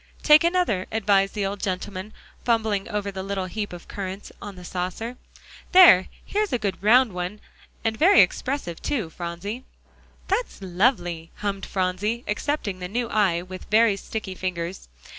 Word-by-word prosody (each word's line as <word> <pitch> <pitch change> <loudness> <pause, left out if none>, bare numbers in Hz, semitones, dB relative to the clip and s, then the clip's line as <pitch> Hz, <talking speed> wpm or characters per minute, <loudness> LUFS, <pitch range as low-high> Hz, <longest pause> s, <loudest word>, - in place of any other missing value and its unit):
"Take 305 +1 +7
another," 340 - +1
advised 200 -2 +2
the 205 -2 0
old 195 +1 -4
gentleman, 190 +1 -4 0.3
fumbling 220 -4 0
over 205 -1 -2
the 190 -1 -5
little 195 -1 -3
heap 205 +3 -4
of 175 -1 -10
currants 195 0 -6
on 205 -1 -7
the 180 -1 -11
saucer. 185 +7 -4 0.6
"There, 350 - +8 0.2
here's 420 0 -1
a 250 - +2
good 200 -5 -3
round 230 +1 +5
one, 180 +3 -4 0.4
and 225 -1 0
very 360 - +6
expressive, 255 - -1
too, 225 - -2
Phronsie." 175 +9 -5 0.6
"That's 430 +6 -1
lovely," 175 -4 0
hummed 200 -1 -3
Phronsie, 195 +5 -1
accepting 210 -3 -2
the 180 - -4
new 235 +4 -2
eye 190 -6 +2
with 185 0 -9
very 220 -1 +5
sticky 200 0 -5
fingers. 180 - -4
200 Hz, 155 wpm, -24 LUFS, 185-230 Hz, 0.6 s, There